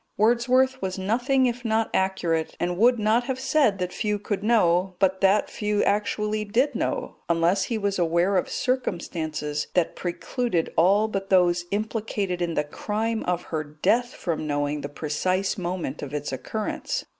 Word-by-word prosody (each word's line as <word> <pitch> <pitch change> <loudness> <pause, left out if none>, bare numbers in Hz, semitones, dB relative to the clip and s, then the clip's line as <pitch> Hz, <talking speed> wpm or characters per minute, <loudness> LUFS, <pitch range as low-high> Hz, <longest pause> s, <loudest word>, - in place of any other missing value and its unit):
Wordsworth 250 +4 +3
was 190 0 -3
nothing 245 +7 +1
if 245 0 -1
not 225 -1 0
accurate, 175 -4 0
and 175 0 -1
would 240 +6 +4
not 220 +3 +2
have 260 0 -3
said 265 -6 +2
that 180 -1 -3
few 210 -1 -1
could 205 -1 -3
know, 190 -4 +2
but 190 0 +1
that 195 +2 +4
few 210 -1 -1
actually 210 +1 0
did 235 +7 +1
know, - - -2
unless 170 +3 +2
he 230 - -2
was 200 -2 -1
aware 170 +3 +2
of 185 - +1
circumstances 160 - -2
that 180 -3 +1
precluded 180 +1 -2
all 200 +6 +4
but 195 -2 -4
those 175 -2 +3
implicated 205 -3 -2
in 170 -2 -1
the 150 - +2
crime 220 +8 -2
of 175 -1 -1
her 155 -1 0
death 220 +12 0
from 160 -3 -3
knowing 145 0 -1
the 145 - -5
precise 185 +6 -1
moment 175 -5 -4
of 145 +1 -5
its 145 -1 -3
occurrence. 215 - -3
195 Hz, 165 wpm, -25 LUFS, 170-220 Hz, -, would